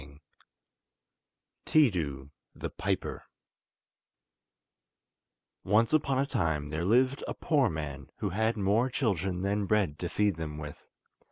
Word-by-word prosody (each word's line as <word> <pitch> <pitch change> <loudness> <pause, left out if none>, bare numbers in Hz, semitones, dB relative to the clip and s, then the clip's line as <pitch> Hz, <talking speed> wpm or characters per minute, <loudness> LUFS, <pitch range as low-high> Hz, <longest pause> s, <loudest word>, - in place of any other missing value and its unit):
] - - -57
Tiidu 80 - +2 0.2
The - - -5
Piper - - -3 2.4
Once 110 +6 +3
upon 140 -4 +2
a 135 - +2
time 80 - -1
there 80 +2 -2
lived 130 +6 +3
a - - -3
poor 140 -6 +2
man 70 -4 -5
who - - -2
had 110 +4 +1
more 105 +6 +2
children 95 - -1
than 100 0 0
bread 95 -9 +1
to 90 - -3
feed 105 -3 +1
them 75 -2 -5
with. 75 -1 -9
100 Hz, 120 wpm, -30 LUFS, 80-115 Hz, 2.4 s, Once